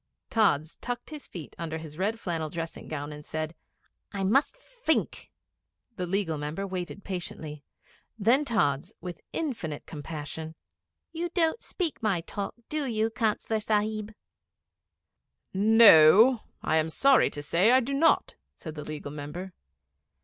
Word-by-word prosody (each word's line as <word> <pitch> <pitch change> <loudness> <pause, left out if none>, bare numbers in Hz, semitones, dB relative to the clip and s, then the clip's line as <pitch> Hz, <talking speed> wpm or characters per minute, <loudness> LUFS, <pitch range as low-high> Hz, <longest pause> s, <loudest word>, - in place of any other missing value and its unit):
Tods 160 -9 +2
tucked 245 +4 -5
his 300 -3 -8
feet 170 -5 -9
under 160 -1 -3
his 155 -2 -9
red 205 +6 -1
flannel 165 -5 -2
dressing 165 +1 -6
gown 145 -1 -5
and 150 0 -10
said 155 +1 -4 0.6
'I 195 -1 -2
must 270 - +2
fink.' - - -2 0.7
The 180 -3 -3
Legal 175 -5 -1
Member 150 +7 -3
waited 185 +1 -5
patiently. 155 -5 -6 0.5
Then 235 +7 +4
Tods, 175 - 0
with 175 -1 -7
infinite 220 - -3
compassion 155 +1 -6 0.6
'You 335 +1 -3
don't 330 +4 +2
speak 345 -5 -3
my 200 -6 +1
talk, 200 +4 -5
do 305 -2 -2
you, 225 -1 0
Councillor 220 -1 0
Sahib?' 215 0 -1 1.4
'No; 215 +2 +7 0.2
I 160 - +2
am 160 0 +1
sorry 270 +9 +5
to 145 - -6
say 175 +8 +3
I 255 +2 +7
do 260 +2 -3
not,' 320 +4 +3 0.2
said 155 - -8
the 150 -1 -7
Legal 150 -2 -6
Member. 150 +6 -7
190 Hz, 140 wpm, -28 LUFS, 155-230 Hz, 1.4 s, No